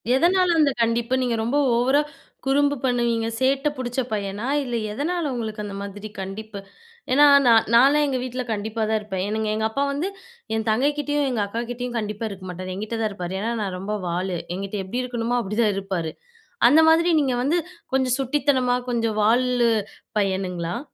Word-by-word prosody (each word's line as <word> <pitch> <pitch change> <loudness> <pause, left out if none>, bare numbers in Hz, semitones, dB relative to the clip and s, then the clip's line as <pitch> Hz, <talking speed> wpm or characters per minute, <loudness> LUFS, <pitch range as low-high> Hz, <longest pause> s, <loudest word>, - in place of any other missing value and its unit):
எதனால 355 +3 +3
அந்த 290 -2 +4
கண்டிப்பு? 230 +2 +1
நீங்க 245 -2 0
ரொம்ப 255 +6 0 0.2
ஓவரா 265 +5 +3 0.4
குறும்பு 285 +1 +2
பண்ணுவீங்க, 235 -2 +1
சேட்ட 270 +2 +2
புடிச்ச 245 0 -3
பையனா? 205 +1 -3 0.2
இல்ல, 245 -3 -3 0.2
எதனால 300 +5 -2
உங்களுக்கு 220 -2 -4
அந்த 200 - -6
மாதிரி 205 +1 -7
கண்டிப்பு? 200 +2 -7 0.5
ஏன்னா 290 +3 +6 0.2
நா 240 - +6 0.2
நானே 275 +5 +6
எங்க 260 -2 -1
வீட்ல 255 0 -4
கண்டிப்பா 220 +1 -3
தா 220 - +2
இருப்பேன். 195 -3 -4
எனக்கு 220 0 -1
எங்க 220 0 -1
அப்பா 275 +5 -1
வந்து 290 +7 -2 0.5
என் 220 0 -2
தங்கை 255 +7 +3
கிட்டேயும், 290 -1 0
எங்க 235 -4 -1
அக்காகிட்டேயும் 240 +3 -4
கண்டிப்பா 210 +1 -4
இருக்க 190 -2 -9
மாட்டாரு. 185 +1 -6
எங்கிட்டதான் 215 +2 -2
இருப்பாரு. 180 -2 -5
ஏனா 225 +4 -1
நா 205 - -1
ரொம்ப 195 +3 -4
வாலு. 180 +1 -2 0.2
ஏங்கிட்ட 195 +2 -4
எப்டி 240 +7 -3
இருக்கணுமோ, 245 -1 -1
அப்பிடித்தான் 210 -1 +1
இருப்பாரு. 190 -5 -3 0.6
அந்த 295 +6 +6
மாரி 335 +2 +5
நீங்க 270 -3 +1
வந்து 315 +6 +2 0.4
கொஞ்ச 260 -1 +2
சுட்டித்தனமா, 260 -2 +1
கொஞ்சம் 230 -2 0
வால்லு 240 +1 +3 0.5
பையனுங்களா? 185 -1 -2
235 Hz, 165 wpm, -23 LUFS, 210-265 Hz, 0.6 s, ஏன்னா